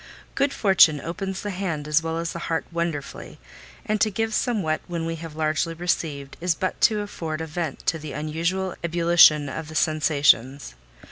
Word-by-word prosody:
Good 280 0 +1
fortune 190 - +5
opens 190 +5 -5
the 205 - -3
hand 175 -6 -3
as 150 +1 +3
well 165 0 -3
as 165 0 -3
the 170 - -5
heart 165 -1 -1
wonderfully; 170 -4 -4 0.5
and 215 0 -1
to 215 - +4
give 220 +2 -2
somewhat 200 -11 0
when 170 -2 -3
we 165 0 -3
have 160 -1 -9
largely 155 +1 -1
received, 155 -5 -3
is 175 -1 +1
but 185 - -3
to 215 -2 +4
afford 165 -6 -5
a 160 - -3
vent 160 -2 -5
to 165 - 0
the 150 -2 -7
unusual 170 +5 -2
ebullition 170 -3 +5
of 155 +3 -6
the 155 - -10
sensations. 145 - +2
165 Hz, 180 wpm, -24 LUFS, 155-180 Hz, 0.5 s, fortune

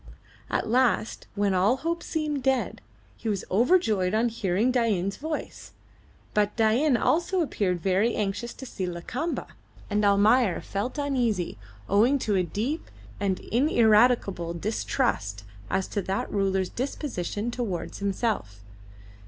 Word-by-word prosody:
At - - -1
last, 240 -1 +1
when 200 -1 +1
all 195 +8 +3
hope 335 +4 -2
seemed 305 -3 -2
dead, 265 -1 0 0.3
he 225 - -4
was 200 -3 -2
overjoyed 215 - +3
on 235 +2 +2
hearing 220 +1 +1
Dain's 210 -6 +1
voice; 310 +1 -6 0.6
but 210 0 +1
Dain 240 +5 +3
also 345 - +1
appeared 195 - 0
very 195 +5 +2
anxious 210 +3 -2
to 265 - -9
see 190 -6 -4
Lakamba, 240 - -3 0.5
and 210 +1 +1
Almayer 205 +1 +4
felt 205 +8 -4
uneasy 245 - 0 0.3
owing 230 +8 +4
to 220 -5 -1
a 185 - +3
deep 220 - -3 0.3
and 195 -2 -1
ineradicable 220 - +3
distrust 170 - -1 0.3
as 190 0 0
to 205 - -1
that 190 +1 -2
ruler's 190 -2 +1
disposition 240 - -3
towards 225 -8 -4
himself. 195 - -2
215 Hz, 130 wpm, -26 LUFS, 195-255 Hz, 0.6 s, Almayer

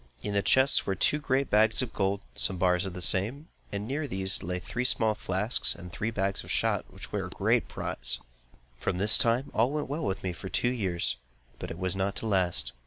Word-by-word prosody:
In 105 - -3
the 100 - +2
chests 130 +6 +3
were 95 - 0
two 150 - +2
great 135 -2 0
bags 110 +4 +4
of 120 - -6
gold, 100 0 0
and - - -2
some 95 - +1
bars 90 +1 +2
of 90 - -7
the 90 - 0
same, 115 - +2 0.2
and 100 +1 -4
near 145 +3 -2
these 95 -5 0
lay 90 +1 -3
three 115 +7 -4
small 110 -3 +4
flasks 105 +2 0
and 90 0 -10
three 110 +1 -2
bags 100 -3 -1
of - - -13
shot - - 0
which - - -11
were - - -2
a - - -10
great - - +1
prize. - - -2 0.6
From 90 - -2
this 105 +5 +6
time, 125 +1 +1
all 115 +3 +2
went 150 -1 -3
well 155 +4 -3
with 95 -8 -3
me 90 -2 -2
for 95 +2 -8
two 120 - 0
years; 90 - -1 0.4
but - - -6
it 80 - -7
was 90 0 -1
not 95 +1 -1
to - - -4
last. 95 -5 +1
100 Hz, 230 wpm, -28 LUFS, 95-125 Hz, 0.6 s, this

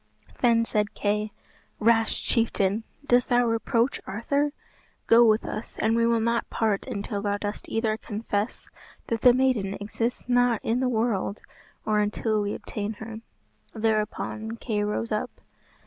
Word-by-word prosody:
Then 230 -2 +4
said 210 -2 -1
Kay, 210 +1 0 0.5
"Rash 225 0 +2
chieftain! 220 -2 +1 0.2
dost 245 -2 +3
thou 245 0 +4
reproach 230 +2 +1
Arthur? 280 +9 0 0.5
Go 230 +1 +7
with 220 -1 +4
us, 215 - -6
and 220 +1 +2
we 230 0 +3
will 235 -1 +3
not 235 +1 0
part 215 -1 0
until 205 -4 -3
thou 205 0 0
dost 205 0 -5
either 220 -1 0
confess 210 0 -3 0.4
that 230 -2 -1
the 250 - +8
maiden 240 -6 +1
exists 225 +4 -3
not 245 -2 +3
in 230 +2 +1
the 255 -1 +1
world, 220 -3 0 0.5
or 215 -1 +2
until 210 +1 0
we 205 0 -2
obtain 210 +1 -4
her." 220 +1 -8 0.6
Thereupon 220 0 -1
Kay 215 -3 -1
rose 210 +2 -2
up. 215 - -1
225 Hz, 145 wpm, -26 LUFS, 210-235 Hz, 0.6 s, the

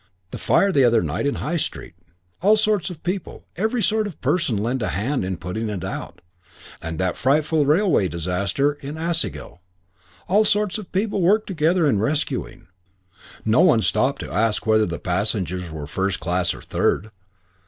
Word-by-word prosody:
That - - -6
fire 200 - +3
the 140 -7 +4
other 115 -3 +4
night 85 - -1
in 140 - 0
High 170 +4 -2
Street. 150 - -4 0.5
All 210 +4 +5
sorts 210 -4 +1
of 170 -4 -10
people, 180 0 -4
every 220 +5 0
sort 215 +2 +1
of 190 - -10
person, 140 - +1
lent 120 +5 -1
a 105 - 0
hand 110 +9 -1
in 95 -1 -3
putting 110 +7 -4
it 100 -5 -4
out. - - -6 0.6
And 80 0 -5
that 90 0 0
frightful 150 +2 +2
railway 160 - +3
disaster 100 - -1
at 145 +2 -6
Aisgill; 165 - -2 0.7
all 205 +4 +4
sorts 210 0 +1
of 205 - -10
people 200 0 0
worked 210 +5 +3
together 170 -1 +1
in 110 -8 +2
rescuing. 125 -2 -2 0.8
No 110 +5 +3
one 140 -11 +5
stopped 135 +2 +1
to - - -7
ask 110 0 +1
whether 110 -1 +3
the 85 -1 -4
passengers 90 -2 -1
were 80 -2 -6
first 95 +5 -1
class 90 0 0
or - - -12
third. 110 +4 0
135 Hz, 175 wpm, -22 LUFS, -, 0.8 s, All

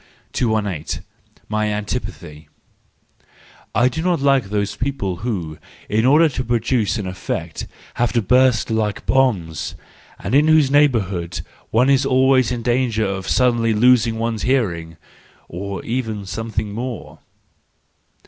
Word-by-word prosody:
218. 105 - -1 0.4
My 110 0 0
Antipathy 105 -7 -5 1.3
.—I 120 +3 +4
do 150 +6 -2
not 175 -1 +1
like 135 -3 +3
those 100 0 -2
people 120 -9 -2
who, 90 -7 -4 0.3
in 110 +4 +2
order 155 +5 +6
to 130 -3 -3
produce 120 -1 0
an 105 - -4
effect, 95 -1 -5 0.3
have 120 -1 0
to 120 - +3
burst 125 +1 +3
like 110 -2 -1
bombs, 110 - 0 0.4
and - - -5
in 145 +3 +5
whose 155 -4 +4
neighbourhood 100 - +1 0.3
one 120 +4 +3
is 135 0 +3
always 130 -1 +3
in 120 -2 -3
danger 120 -2 +1
of 95 -1 -3
suddenly 120 -3 +2
losing 115 0 +4
one's 115 -1 -2
hearing—or 95 - -4
even 110 -4 -3
something 110 +1 -4
more. 120 +1 -6
115 Hz, 125 wpm, -20 LUFS, 100-130 Hz, 1.3 s, order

